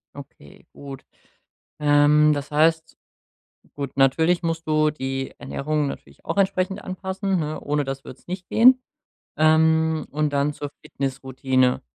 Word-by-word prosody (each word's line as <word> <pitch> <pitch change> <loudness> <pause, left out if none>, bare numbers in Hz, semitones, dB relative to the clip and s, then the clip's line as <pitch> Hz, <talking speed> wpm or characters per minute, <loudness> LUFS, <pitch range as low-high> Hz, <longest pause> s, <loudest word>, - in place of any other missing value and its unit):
Okay, 135 - -14
gut. 140 -2 -10 0.7
Ähm, 150 +1 +4
das 145 0 -5
heißt, 160 +2 +1 0.8
gut, 140 -2 -6
natürlich 160 +7 +3
musst 165 -1 -3
du 155 0 +3
die 135 -2 -5
Ernährung 150 0 -2
natürlich - - -10
auch - - -3
entsprechend 190 -1 0
anpassen, 190 0 -3
ne, 155 0 -4
ohne 145 0 -1
das 135 0 -6
würd's 130 - -13
nicht 180 0 -6
gehen. 255 +3 +5 0.6
Ähm, 160 0 +3
Und 150 0 -1
dann 140 +1 +1
zur 145 0 -7
Fitnessroutine. 130 -1 -1
150 Hz, 130 wpm, -23 LUFS, 140-165 Hz, 0.8 s, gehen